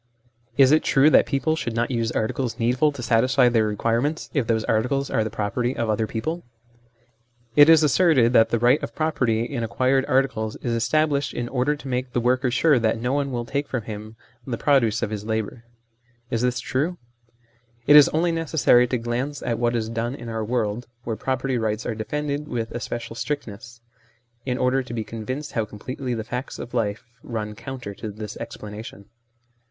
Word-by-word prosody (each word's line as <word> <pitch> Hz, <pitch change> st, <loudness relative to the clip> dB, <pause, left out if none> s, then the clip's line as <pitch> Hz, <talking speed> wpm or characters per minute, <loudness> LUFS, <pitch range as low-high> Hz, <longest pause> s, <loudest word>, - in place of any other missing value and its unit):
Is 135 Hz, -1 st, +6 dB
it 155 Hz, -, +5 dB
true 145 Hz, +3 st, +4 dB
that -, -, +5 dB
people 155 Hz, +3 st, 0 dB
should 120 Hz, -7 st, -4 dB
not 120 Hz, +2 st, 0 dB
use 115 Hz, -2 st, 0 dB
articles 115 Hz, +1 st, -2 dB
needful 125 Hz, +6 st, +2 dB
to 125 Hz, -, -7 dB
satisfy 125 Hz, +2 st, +4 dB
their 115 Hz, -2 st, +2 dB
requirements, 115 Hz, +8 st, -1 dB
if 135 Hz, -7 st, 0 dB
those 110 Hz, -1 st, +1 dB
articles 125 Hz, +6 st, 0 dB
are 110 Hz, -, +2 dB
the 110 Hz, -, -3 dB
property 120 Hz, +5 st, -2 dB
of 115 Hz, -2 st, 0 dB
other 110 Hz, +1 st, 0 dB
people? 155 Hz, +11 st, -3 dB, 1.1 s
It 145 Hz, +1 st, +8 dB
is 160 Hz, -1 st, +7 dB
asserted 145 Hz, -6 st, +4 dB
that 115 Hz, -2 st, +5 dB
the 120 Hz, -, +1 dB
right 125 Hz, +6 st, +3 dB
of 140 Hz, -, -6 dB
property 125 Hz, -8 st, +1 dB
in 120 Hz, -1 st, -3 dB
acquired 130 Hz, +5 st, +1 dB
articles 130 Hz, -5 st, 0 dB
is 120 Hz, -, -3 dB
established 145 Hz, +4 st, +1 dB
in 120 Hz, -, -2 dB
order 135 Hz, +3 st, +1 dB
to 145 Hz, -, -11 dB
make 125 Hz, -1 st, -3 dB
the -, -, +1 dB
worker 125 Hz, +2 st, +1 dB
sure 135 Hz, +2 st, +3 dB
that 110 Hz, 0 st, +1 dB
no 125 Hz, +3 st, -1 dB
one 140 Hz, -1 st, 0 dB
will 120 Hz, -1 st, -3 dB
take 140 Hz, +4 st, -2 dB
from 130 Hz, -4 st, -3 dB
him 110 Hz, +1 st, -8 dB, 0.3 s
the 120 Hz, -3 st, -2 dB
produce 120 Hz, -6 st, +2 dB
of 110 Hz, -, -2 dB
his 105 Hz, -1 st, -4 dB
labour. 110 Hz, +1 st, -3 dB, 0.7 s
Is 115 Hz, -, 0 dB
this 125 Hz, 0 st, +1 dB
true? 150 Hz, +9 st, -1 dB, 0.9 s
It 145 Hz, -, +7 dB
is 150 Hz, -1 st, +9 dB
only 170 Hz, +2 st, +1 dB
necessary 160 Hz, -6 st, +3 dB
to 125 Hz, -, 0 dB
glance 120 Hz, +5 st, -3 dB
at 115 Hz, -1 st, -1 dB
what 120 Hz, 0 st, +1 dB
is 110 Hz, -2 st, -1 dB
done 115 Hz, +3 st, -3 dB
in 120 Hz, -4 st, -8 dB
our 110 Hz, -1 st, -3 dB
world, 115 Hz, 0 st, -2 dB, 0.2 s
where 115 Hz, -2 st, -3 dB
property 130 Hz, +2 st, -1 dB
rights 110 Hz, -1 st, -2 dB
are -, -, -1 dB
defended 145 Hz, +6 st, -3 dB
with 115 Hz, -5 st, -3 dB
especial 120 Hz, 0 st, -5 dB
strictness, 120 Hz, -4 st, -5 dB, 0.7 s
in 125 Hz, -1 st, 0 dB
order 130 Hz, +1 st, +2 dB
to 125 Hz, -2 st, -7 dB
be 110 Hz, -, -2 dB
convinced 130 Hz, +7 st, -5 dB
how 115 Hz, -, 0 dB
completely 125 Hz, +5 st, -5 dB
the 110 Hz, -, -3 dB
facts 125 Hz, +4 st, -5 dB
of 120 Hz, -, -8 dB
life 110 Hz, -2 st, -1 dB, 0.2 s
run 110 Hz, -3 st, -4 dB
counter 125 Hz, -2 st, -7 dB
to 110 Hz, -, -7 dB
this 105 Hz, 0 st, -7 dB
explanation. 105 Hz, -1 st, -8 dB
120 Hz, 190 wpm, -23 LUFS, 115-135 Hz, 1.1 s, is